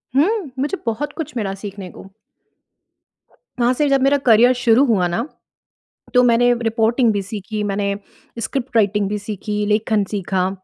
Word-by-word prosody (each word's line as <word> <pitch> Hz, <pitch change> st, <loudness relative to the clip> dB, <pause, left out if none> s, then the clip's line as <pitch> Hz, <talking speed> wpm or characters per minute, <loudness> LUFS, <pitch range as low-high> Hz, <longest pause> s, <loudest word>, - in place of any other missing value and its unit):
हुँ, 350 Hz, -, +1 dB
मुझे 295 Hz, +8 st, -1 dB
बहुत 230 Hz, +6 st, -2 dB
कुछ 310 Hz, -5 st, -5 dB
मिला 195 Hz, -3 st, -2 dB
सीखने 195 Hz, -1 st, -8 dB
को। -, -, -13 dB, 1.5 s
वहाँ 240 Hz, +1 st, +3 dB
से 295 Hz, +3 st, +1 dB
जब 275 Hz, -1 st, +3 dB
मेरा 275 Hz, +2 st, +4 dB
करियर 240 Hz, +1 st, +6 dB
शुरू 245 Hz, +2 st, +3 dB
हुआ 195 Hz, -7 st, +2 dB
ना 225 Hz, +10 st, -2 dB, 0.9 s
तो 250 Hz, 0 st, +5 dB
मैंने 245 Hz, 0 st, +4 dB
रिपोर्टिंग 225 Hz, +1 st, +2 dB
भी 200 Hz, -, -1 dB
सीखी 210 Hz, +1 st, -5 dB
मैंने 200 Hz, 0 st, -1 dB, 0.5 s
स्क्रिप्ट 250 Hz, +2 st, -4 dB
राइटिंग 205 Hz, -1 st, +2 dB
भी 210 Hz, -, -2 dB
सीखी 210 Hz, 0 st, -4 dB
लेखन 210 Hz, 0 st, +1 dB
सीखा। 190 Hz, -2 st, -1 dB
225 Hz, 150 wpm, -19 LUFS, 205-250 Hz, 1.5 s, करियर